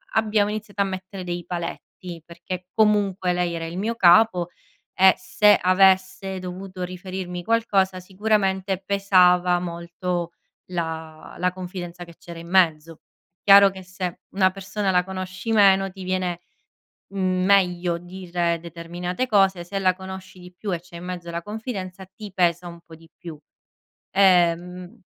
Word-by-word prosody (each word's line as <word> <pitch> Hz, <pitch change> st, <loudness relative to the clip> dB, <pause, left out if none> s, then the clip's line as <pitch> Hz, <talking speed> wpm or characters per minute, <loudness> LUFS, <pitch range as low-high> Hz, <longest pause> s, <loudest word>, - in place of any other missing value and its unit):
abbiamo 215 Hz, -2 st, +2 dB
iniziato 210 Hz, -1 st, -4 dB
a -, -, +3 dB
mettere 190 Hz, 0 st, -6 dB
dei 175 Hz, -1 st, -5 dB
paletti 175 Hz, 0 st, -7 dB
perché 175 Hz, +2 st, -7 dB
comunque 205 Hz, -4 st, +2 dB
lei 175 Hz, -1 st, -1 dB
era 165 Hz, -1 st, -4 dB
il 165 Hz, +2 st, -6 dB
mio 220 Hz, +4 st, -2 dB
capo 180 Hz, -2 st, +5 dB, 0.4 s
e 190 Hz, 0 st, +6 dB
se 205 Hz, +2 st, +4 dB
avesse 190 Hz, 0 st, +2 dB
dovuto 185 Hz, +1 st, -7 dB
riferirmi 180 Hz, 0 st, -6 dB
qualcosa 195 Hz, -5 st, +1 dB
sicuramente 190 Hz, 0 st, 0 dB
pesava 180 Hz, -3 st, +4 dB
molto 170 Hz, 0 st, -4 dB, 0.4 s
la 160 Hz, -2 st, -5 dB
la 180 Hz, +1 st, +1 dB
confidenza 180 Hz, -1 st, -7 dB
che 170 Hz, -1 st, -15 dB
c'era 170 Hz, -1 st, -10 dB
in 170 Hz, +1 st, -11 dB
mezzo. 165 Hz, -3 st, +2 dB, 0.4 s
Chiaro 200 Hz, 0 st, +8 dB
che 190 Hz, 0 st, -10 dB
se 185 Hz, -1 st, -5 dB, 0.2 s
una 190 Hz, -1 st, +4 dB
persona 195 Hz, +1 st, -3 dB
la 180 Hz, -1 st, +3 dB
conosci 185 Hz, +2 st, -5 dB
meno 195 Hz, -2 st, +5 dB
ti 190 Hz, 0 st, -10 dB
viene 180 Hz, -2 st, -2 dB, 0.7 s
meglio 185 Hz, -2 st, +2 dB
dire 175 Hz, -1 st, -3 dB
determinate 175 Hz, +6 st, -4 dB
cose, 195 Hz, -5 st, +2 dB
se 195 Hz, +3 st, -4 dB
la 185 Hz, -1 st, +3 dB
conosci 190 Hz, 0 st, -9 dB
di 180 Hz, 0 st, -13 dB
più 205 Hz, -3 st, -4 dB
e 175 Hz, -, -1 dB
c'è 175 Hz, +1 st, -19 dB
in 170 Hz, -, -9 dB
mezzo 180 Hz, -1 st, -6 dB
la 170 Hz, 0 st, -4 dB
confidenza 195 Hz, -3 st, -6 dB
ti 205 Hz, +2 st, -11 dB
pesa 175 Hz, -1 st, +1 dB
un 170 Hz, -, -10 dB
po' 165 Hz, -, -14 dB
di 165 Hz, 0 st, -20 dB
più. 170 Hz, -3 st, -9 dB, 0.8 s
Ehm 180 Hz, 0 st, +2 dB
185 Hz, 145 wpm, -23 LUFS, 175-195 Hz, 0.8 s, Chiaro